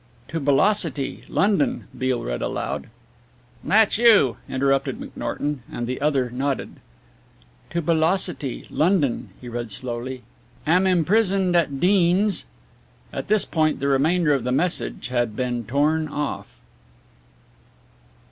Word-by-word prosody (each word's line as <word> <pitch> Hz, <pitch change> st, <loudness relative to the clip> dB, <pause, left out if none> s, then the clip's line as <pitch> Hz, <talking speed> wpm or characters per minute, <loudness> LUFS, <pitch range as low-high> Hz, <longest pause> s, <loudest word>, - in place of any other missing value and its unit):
"'To 165 Hz, +2 st, -2 dB
Belocity, 145 Hz, 0 st, +1 dB
London,'" 245 Hz, +6 st, +1 dB
Beale 130 Hz, -1 st, -1 dB
read -, -, -3 dB
aloud. -, -, -3 dB, 0.8 s
"That's 220 Hz, 0 st, +3 dB
you," 210 Hz, -, +5 dB
interrupted 135 Hz, 0 st, 0 dB
McNorton, 145 Hz, -1 st, -4 dB
and 120 Hz, -, -4 dB
the 130 Hz, +2 st, -4 dB
other 135 Hz, -5 st, +1 dB
nodded. 135 Hz, +2 st, -3 dB, 0.9 s
"'To 170 Hz, 0 st, -2 dB
Belocity, 160 Hz, -3 st, 0 dB
London,'" 150 Hz, -, +1 dB
he 125 Hz, -, -10 dB
read 120 Hz, -1 st, -4 dB
slowly. 125 Hz, +2 st, -5 dB, 0.4 s
"'Am 180 Hz, +4 st, +3 dB
imprisoned 185 Hz, +1 st, +2 dB
at 145 Hz, -5 st, +1 dB
Deans 190 Hz, +3 st, +3 dB, 0.3 s
'" -, -, -32 dB
At -, -, -4 dB
this 215 Hz, -2 st, +4 dB
point 155 Hz, -2 st, 0 dB
the 140 Hz, +1 st, 0 dB
remainder 150 Hz, +3 st, +3 dB
of 135 Hz, -4 st, 0 dB
the 125 Hz, -, -1 dB
message 165 Hz, -1 st, -1 dB
had 120 Hz, -3 st, -1 dB
been 120 Hz, -2 st, -2 dB
torn 150 Hz, +6 st, +1 dB
off. 150 Hz, -1 st, -5 dB
145 Hz, 120 wpm, -23 LUFS, 130-180 Hz, 0.9 s, you